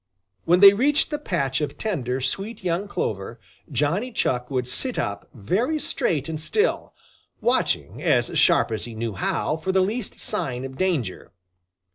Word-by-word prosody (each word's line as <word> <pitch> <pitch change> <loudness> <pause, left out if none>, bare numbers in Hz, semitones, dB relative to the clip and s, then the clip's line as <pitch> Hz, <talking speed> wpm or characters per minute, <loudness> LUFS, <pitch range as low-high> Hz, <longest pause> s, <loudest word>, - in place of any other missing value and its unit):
When 175 +2 +4
they 200 0 +11
reached 285 +9 +2
the 295 - -2
patch 155 - -1
of 150 - -3
tender, 135 - -2
sweet, 195 - -3
young 180 +3 -1
clover, 110 - -3 0.3
Johnny 180 - 0
Chuck 125 - -1
would 130 -3 -1
sit 245 - -1
up 100 0 -3
very 205 - 0
straight 165 - -1
and 160 -1 -3
still, 430 - 0 0.4
watching - - 0
as - - +2
sharp - - +4
as 110 -1 -2
he 115 -2 -8
knew 115 -1 -3
how 125 - -1
for 190 +4 -2
the 190 - +3
least 210 +4 -2
sign 125 -1 -2
of 130 0 -8
danger. 145 - -2
160 Hz, 160 wpm, -24 LUFS, 125-205 Hz, 0.4 s, they